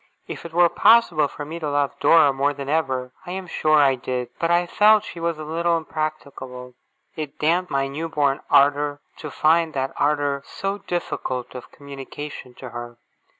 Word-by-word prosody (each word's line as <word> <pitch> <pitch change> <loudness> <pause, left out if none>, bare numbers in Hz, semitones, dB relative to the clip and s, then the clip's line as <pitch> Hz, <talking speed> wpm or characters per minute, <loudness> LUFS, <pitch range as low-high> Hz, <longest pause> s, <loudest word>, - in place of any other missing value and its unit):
If - - -8
it 170 - -7
were 175 +1 +5
possible 170 -7 +4
for 145 +1 -8
me 165 +3 -6
to 155 -3 -3
love 145 -1 0
Dora 155 -4 +5
more 140 +2 0
than 140 -1 -6
ever, 130 -5 -1 0.2
I 180 - -4
am 190 0 -5
sure 155 -3 +2
I 140 -2 +5
did. 125 -1 -4
But 165 - 0
I 175 +1 +3
felt 210 +4 +4
she 170 - -9
was 165 -1 -1
a 155 - -7
little 170 +2 0
impracticable. 140 -5 -6 0.4
It 155 -3 -6
damped 175 +4 +1
my 135 0 0
new 155 +4 -5
born 145 -2 +1
ardour, 145 +1 +3 0.2
to 150 - -7
find 160 +2 +2
that 135 0 -2
ardour 145 -1 +1
so 195 +6 -4
difficult 130 -9 -4
of 125 -1 -10
communication 140 -2 -9
to 130 - -9
her. 120 0 -8
150 Hz, 185 wpm, -23 LUFS, 135-165 Hz, 0.4 s, were